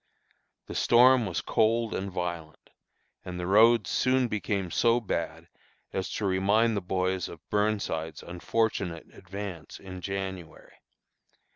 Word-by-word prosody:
The -, -, -8 dB
storm 125 Hz, -1 st, +5 dB
was 90 Hz, -, -2 dB
cold 115 Hz, +1 st, +1 dB
and 95 Hz, +1 st, -3 dB
violent, 85 Hz, -3 st, -5 dB, 0.5 s
and 90 Hz, -1 st, -6 dB
the 90 Hz, -, -3 dB
roads 110 Hz, +1 st, +5 dB
soon 130 Hz, -1 st, +2 dB
became 100 Hz, -4 st, -2 dB
so 115 Hz, +5 st, +3 dB
bad 85 Hz, -6 st, -4 dB, 0.5 s
as 95 Hz, -, -2 dB
to 105 Hz, -, -2 dB
remind 100 Hz, +4 st, +2 dB
the 100 Hz, -, -1 dB
boys 95 Hz, 0 st, -1 dB
of 85 Hz, -, -13 dB
Burnside's 105 Hz, -7 st, -1 dB
unfortunate 90 Hz, -1 st, -2 dB
advance 95 Hz, -3 st, -8 dB
in 95 Hz, -1 st, -9 dB
January. 95 Hz, -3 st, -6 dB
95 Hz, 125 wpm, -28 LUFS, 90-110 Hz, 0.5 s, storm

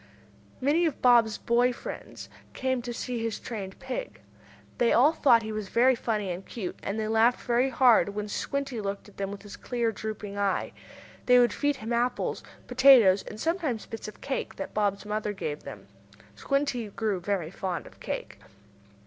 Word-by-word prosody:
Many 310 Hz, +6 st, +3 dB
of 310 Hz, -, -4 dB
Bob's 235 Hz, -3 st, +5 dB
boy 245 Hz, +1 st, +2 dB
friends 245 Hz, -, -8 dB, 0.3 s
came 260 Hz, -1 st, -1 dB
to 240 Hz, 0 st, -5 dB
see 240 Hz, 0 st, -4 dB
his 225 Hz, -2 st, -2 dB
trained 195 Hz, -5 st, -6 dB
pig. 270 Hz, -, -6 dB, 0.6 s
They 240 Hz, -, +4 dB
all 280 Hz, +7 st, +5 dB
thought 240 Hz, -8 st, +4 dB
he 220 Hz, -, -5 dB
was 215 Hz, -2 st, -4 dB
very 255 Hz, +3 st, +4 dB
funny 215 Hz, -5 st, -2 dB
and 180 Hz, +2 st, -5 dB
cute, 195 Hz, -5 st, -6 dB
and 205 Hz, +3 st, -3 dB
they 215 Hz, -, -1 dB
laughed 225 Hz, +3 st, +3 dB
very 245 Hz, +2 st, +2 dB
hard 245 Hz, -4 st, +5 dB
when 210 Hz, 0 st, -3 dB
Squinty 275 Hz, +2 st, -3 dB
looked 200 Hz, 0 st, -4 dB
at 205 Hz, -, -21 dB
them 195 Hz, -1 st, -2 dB
with 200 Hz, 0 st, -8 dB
his 205 Hz, -1 st, -9 dB
queer, 235 Hz, -2 st, -1 dB
drooping 210 Hz, -2 st, -6 dB
eye. 200 Hz, -1 st, 0 dB, 0.6 s
They 250 Hz, 0 st, +7 dB
would 240 Hz, -3 st, +4 dB
feed 290 Hz, 0 st, 0 dB
him 225 Hz, -1 st, -4 dB
apples, 245 Hz, +1 st, 0 dB, 0.2 s
potatoes 235 Hz, -8 st, +6 dB
and 215 Hz, -, -10 dB
sometimes 320 Hz, -, -1 dB
bits 225 Hz, -, -7 dB
of 215 Hz, -, -11 dB
cake 270 Hz, -, -3 dB
that 195 Hz, -, -6 dB
Bob's 205 Hz, -1 st, 0 dB
mother 210 Hz, 0 st, -2 dB
gave 150 Hz, -6 st, -4 dB
them. 100 Hz, -2 st, -9 dB, 0.5 s
Squinty 275 Hz, -, -1 dB
grew 205 Hz, -2 st, -2 dB
very 175 Hz, -3 st, -2 dB
fond 185 Hz, -2 st, -4 dB
of -, -, -15 dB
cake. -, -, -5 dB
225 Hz, 180 wpm, -28 LUFS, 205-250 Hz, 0.6 s, They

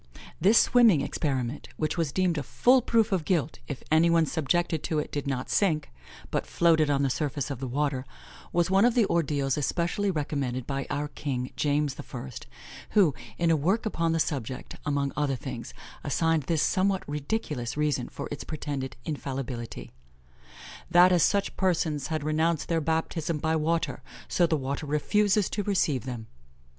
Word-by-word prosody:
This 200 Hz, +7 st, +5 dB
swimming 225 Hz, -, +5 dB
experiment, 135 Hz, -3 st, -2 dB
which 155 Hz, -, -1 dB
was 165 Hz, -5 st, -1 dB
deemed 180 Hz, -2 st, +1 dB
a -, -, -2 dB
full 250 Hz, -, +3 dB
proof 225 Hz, -2 st, +2 dB
of 185 Hz, -4 st, +1 dB
guilt 165 Hz, -4 st, 0 dB
if 140 Hz, -, -6 dB
any 160 Hz, +2 st, +5 dB
one 165 Hz, -1 st, +4 dB
subjected 160 Hz, +1 st, 0 dB
to 160 Hz, -, -1 dB
it 150 Hz, -, -2 dB
did 145 Hz, -1 st, -3 dB
not 130 Hz, -2 st, -2 dB
sink, 160 Hz, -, +1 dB, 0.4 s
but -, -, -1 dB
floated 160 Hz, -3 st, +3 dB
on 140 Hz, -1 st, +2 dB
the 135 Hz, -, +2 dB
surface 145 Hz, -1 st, -2 dB
of 135 Hz, -, -5 dB
the 130 Hz, -, -4 dB
water, 135 Hz, 0 st, -1 dB, 0.5 s
was 175 Hz, +1 st, +1 dB
one 195 Hz, +2 st, +5 dB
of 240 Hz, 0 st, +4 dB
the 235 Hz, -4 st, +4 dB
ordeals 145 Hz, -6 st, 0 dB
especially 170 Hz, +7 st, 0 dB
recommended 140 Hz, -6 st, -2 dB
by 135 Hz, -1 st, -3 dB
our 145 Hz, +1 st, -2 dB
king, 130 Hz, -3 st, -4 dB
James 145 Hz, -1 st, 0 dB
I., 65 Hz, -, -7 dB, 0.7 s
who, 185 Hz, -9 st, +5 dB, 0.2 s
in 170 Hz, -1 st, +2 dB
a -, -, +5 dB
work 185 Hz, +11 st, +1 dB
upon 165 Hz, -6 st, 0 dB
the 165 Hz, -, +1 dB
subject, 130 Hz, -4 st, -3 dB
among 140 Hz, -1 st, 0 dB
other 145 Hz, -2 st, 0 dB
things, -, -, -6 dB, 0.3 s
assigned 165 Hz, +1 st, +1 dB
this 165 Hz, -3 st, +2 dB
somewhat 190 Hz, 0 st, +1 dB
ridiculous 145 Hz, -, -3 dB
reason 150 Hz, -4 st, 0 dB
for -, -, -6 dB
its 145 Hz, -, -5 dB
pretended 140 Hz, -5 st, -4 dB
infallibility: 130 Hz, -6 st, -5 dB, 1.0 s
"That 175 Hz, +1 st, +7 dB
as 175 Hz, -2 st, +4 dB
such 200 Hz, +5 st, +2 dB
persons 165 Hz, -6 st, 0 dB
had 155 Hz, -2 st, -2 dB
renounced 155 Hz, +1 st, 0 dB
their 165 Hz, -1 st, +1 dB
baptism 160 Hz, 0 st, -1 dB
by 160 Hz, +2 st, 0 dB
water, 165 Hz, +1 st, 0 dB, 0.3 s
so 175 Hz, -, +2 dB
the 160 Hz, -, +1 dB
water 140 Hz, +2 st, -4 dB
refuses 200 Hz, +7 st, +2 dB
to 205 Hz, -, -1 dB
receive 170 Hz, -, 0 dB
them." 120 Hz, -4 st, -5 dB
155 Hz, 170 wpm, -27 LUFS, 140-170 Hz, 1.0 s, That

